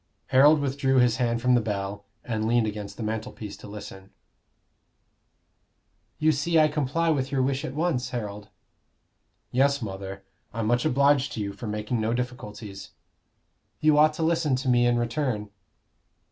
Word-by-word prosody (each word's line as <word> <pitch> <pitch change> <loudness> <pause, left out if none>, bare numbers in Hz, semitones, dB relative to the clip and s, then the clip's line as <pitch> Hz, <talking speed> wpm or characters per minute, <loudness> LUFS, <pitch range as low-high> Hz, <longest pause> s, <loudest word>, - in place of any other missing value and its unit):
Harold 145 +4 +6
withdrew 135 -1 0
his 125 -3 +4
hand 120 -2 0
from 125 0 +4
the 120 - +4
bell, 100 -1 -4 0.2
and 110 -2 -2
leaned 120 0 +3
against 105 -1 -5
the 115 - -4
mantelpiece 110 -1 -5
to 105 - -12
listen. 100 -2 -10 2.1
"You 155 +1 +3
see 160 +3 +1
I 155 0 +5
comply 150 +3 0
with 135 -3 -1
your 135 -2 +1
wish 135 +1 -1
at 130 - -5
once, 150 -6 0
Harold?" 105 -4 -5 1.0
"Yes, 140 +2 +3
mother, 95 -3 -6 0.3
I'm 115 -1 -1
much 120 +2 +1
obliged 140 +1 +3
to - - -5
you 100 -1 -3
for 120 - -7
making 105 +2 -2
no 115 +2 0
difficulties." 105 -5 -6 0.9
"You 155 -1 +4
ought 155 0 +5
to 165 - -2
listen 160 -4 +2
to 130 +1 -2
me 120 -1 +4
in 120 0 +2
return." 120 -3 -2
120 Hz, 160 wpm, -26 LUFS, 105-140 Hz, 2.1 s, Harold